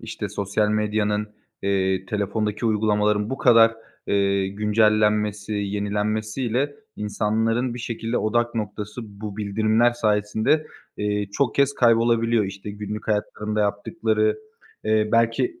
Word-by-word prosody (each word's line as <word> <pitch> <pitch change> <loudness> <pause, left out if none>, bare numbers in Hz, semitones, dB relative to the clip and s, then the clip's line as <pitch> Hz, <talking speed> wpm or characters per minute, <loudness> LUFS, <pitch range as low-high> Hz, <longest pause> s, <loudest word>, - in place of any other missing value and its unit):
işte, - - -5
sosyal 100 +1 -1
medyanın, 105 0 0 0.3
eee, 95 -1 0
telefondaki 105 +2 -2
uygulamaların 105 0 +1
bu 135 - -3
kadar, 115 -2 +6 0.3
eee, 100 -1 +1
güncellenmesi, 105 0 +1
yenilenmesiyle 105 +6 -1 0.2
insanların 110 +4 0
bir - - -6
şekilde 115 0 -3
odak 120 +2 0
noktası 105 +1 -4 0.2
bu 105 -2 -6
bildirimler 110 +3 +2
sayesinde, 110 +6 +1 0.3
eee, 105 0 -1
çok 135 -1 0
kez 140 0 +2
kaybolabiliyor. 115 -2 +3
İşte, 100 +1 -7
günlük 105 +1 -6
hayatlarında 105 0 -1
yaptıkları, 110 - 0 0.5
eee, 110 0 +2
belki 115 - +1
105 Hz, 110 wpm, -23 LUFS, 105-115 Hz, 0.5 s, kadar